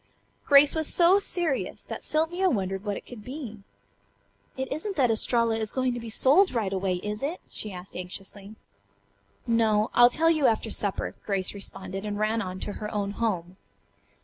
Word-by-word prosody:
Grace 285 0 +7
was 315 -2 +1
so 355 +3 +5
serious 345 -8 -2
that - - -7
Sylvia 345 +5 +1
wondered 195 - -2
what 205 -2 -2
it - - -10
could 235 -4 -11
be. 250 -4 -7 1.0
"It 265 +1 -3
isn't 385 +7 -4
that 255 -5 +3
Estralla 230 0 +2
is 220 -1 -2
going 255 -1 0
to 240 - -4
be 230 -1 -7
sold 280 - +4
right 205 -4 0
away, 190 -1 0
is 210 0 -4
it?" 305 +6 -3
she 215 - -5
asked 180 0 -9
anxiously. 195 +3 -7 0.9
"No. 220 -2 +2
I'll 240 0 +7
tell 325 +6 +2
you 310 -4 +3
after 220 0 0
supper," 200 -2 -1
Grace 195 -3 -1
responded 195 -1 -6
and 205 -1 -3
ran 215 +2 0
on 185 -2 -5
to 205 - -3
her 210 - -4
own 200 -1 -2
home. 190 -5 -2
225 Hz, 175 wpm, -27 LUFS, 200-275 Hz, 1.0 s, Grace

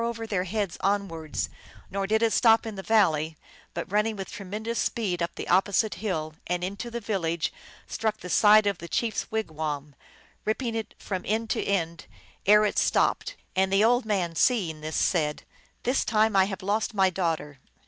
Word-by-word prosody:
87 230 - 0
over 230 -1 -5
their 195 -4 0
heads 200 -1 -2
onwards; 190 -6 -1 0.4
nor 195 0 -1
did 220 +2 +2
it 225 - +3
stop 225 -1 +5
in 220 - -4
the 195 - -6
val 210 -4 +4
ley, 155 +1 -4 0.4
but, 170 +2 -4
running 210 +2 +1
with 195 -2 -6
tremendous 210 +3 -4
speed 195 -4 -1
up 170 - -2
the - - -6
op 185 +2 +4
posite 210 +2 +1
hill 160 -7 -3
and 180 0 -1
into 200 +6 -4
the 235 0 -4
village, 175 -7 -1 0.3
struck 220 -1 -2
the 180 - -9
side 210 +4 +6
of 200 -3 0
the 170 - -7
chief 225 +5 0
s - - -1
wigwam, 155 -8 -3 0.5
ripping 230 +2 -1
it 225 -2 -4
up - - -17
from 190 -3 -3
end 220 +1 0
to - - 0
end 170 -5 -1 0.4
ere 210 +1 +7
it 205 - +1
stopped. - - +1 0.2
And 190 0 +2
the 195 +2 +4
old 245 +2 +3
man, 190 -6 0
seeing 175 -9 +1
this, 155 0 -4
said, 150 -4 +1 0.2
" - - -35
This 255 +3 +2
time 220 -1 +2
I 190 -1 +6
have 195 -1 -5
lost 215 +3 0
my 190 -2 +4
daughter 160 -6 -2
200 Hz, 200 wpm, -27 LUFS, 170-220 Hz, 0.5 s, ere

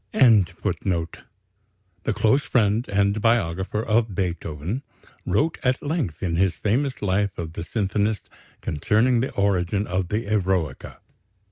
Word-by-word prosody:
Anton 110 -9 +5
Schindler, 85 -3 0 1.0
the - - +1
close 115 +7 +3
friend 110 -2 +1
and 100 +1 +1
biographer 105 -2 +1
of 110 -2 +1
Beethoven, 90 - -3 0.5
wrote 160 +2 +1
at 125 0 0
length 145 - -2
in 85 -3 0
his 95 0 +2
famous 125 +4 -1
Life 100 0 0
of 80 -2 -5
the 85 - -5
symphonist 105 +1 -1 0.3
concerning 110 - +2
the 130 - 0
origin 100 0 +1
of 95 -1 -1
the 105 +2 -1
Eroica. 95 -8 -1
100 Hz, 130 wpm, -24 LUFS, 90-115 Hz, 1.0 s, Anton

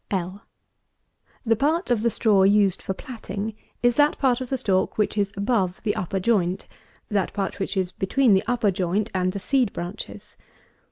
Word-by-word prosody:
L. 190 +1 -4 1.0
The 225 0 +3
part 300 - 0
of 235 -3 +2
the 235 - +2
straw 210 -3 +3
used 195 -1 +3
for 190 - -4
platting; 220 -3 -6 0.3
that 290 +5 +3
part 260 -2 +2
of 255 - -5
the 265 - 0
stalk 195 -6 0
which 210 0 +1
is 200 -1 0
above 200 -4 0
the 210 -2 0
upper 190 +2 -2
joint; 185 -3 0 0.4
that 200 -3 0
part 195 0 -3
which 195 +1 -3
is 185 -1 0
between 230 +5 +2
the 190 - +4
upper 235 -4 +2
joint 190 +3 -1
and 185 -1 +1
the 200 - -5
seed 255 0 +1
branches. 175 +5 -7
205 Hz, 175 wpm, -24 LUFS, 190-235 Hz, 1.0 s, the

